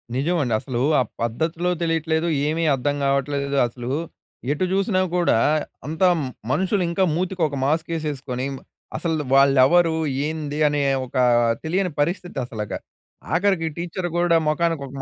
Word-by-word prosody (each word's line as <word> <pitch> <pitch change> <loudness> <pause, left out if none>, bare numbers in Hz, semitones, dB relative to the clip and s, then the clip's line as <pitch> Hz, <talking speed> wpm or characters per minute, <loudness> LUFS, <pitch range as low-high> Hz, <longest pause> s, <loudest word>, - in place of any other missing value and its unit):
నిజమండి 145 -3 0
అసలు 125 -3 -3 0.2
ఆ - - +4 0.2
పద్ధతులు 160 +9 -1
తెలియట్లేదు, 165 0 0 0.2
ఏమీ 160 +2 0
అర్థం 145 +2 0
కావట్లేదు 140 0 0
అసలు 120 +1 -6 0.6
ఎటు 150 +5 0
చూసినా 195 -1 +1
కూడా 175 -10 +3 0.5
అంతా 160 +4 +2 0.4
మనుషులు 190 +4 +1
ఇంకా 170 +3 +1
మూతికి 185 +1 -2
ఒక 140 - -5
మాస్క్ 160 +4 0
వేసేసుకొని, 140 -5 -3
మ - - -8 0.4
అసలు 160 -3 -1
వాళ్ళు 140 0 +5
ఎవరు? 165 +2 +4 0.3
ఏంది? 155 -2 -4
అనే 145 0 0 0.2
ఒక 130 - -15 0.5
తెలియని 180 +3 0
పరిస్థితి 175 0 -2
అసలక. 105 -3 -6 0.6
ఆఖరికి 180 -2 +2
టీచర్ 175 +1 -3
కూడా 175 -1 +3
మొఖానికి 165 0 0
ఒక - - -12
160 Hz, 135 wpm, -22 LUFS, 140-175 Hz, 0.6 s, వాళ్ళు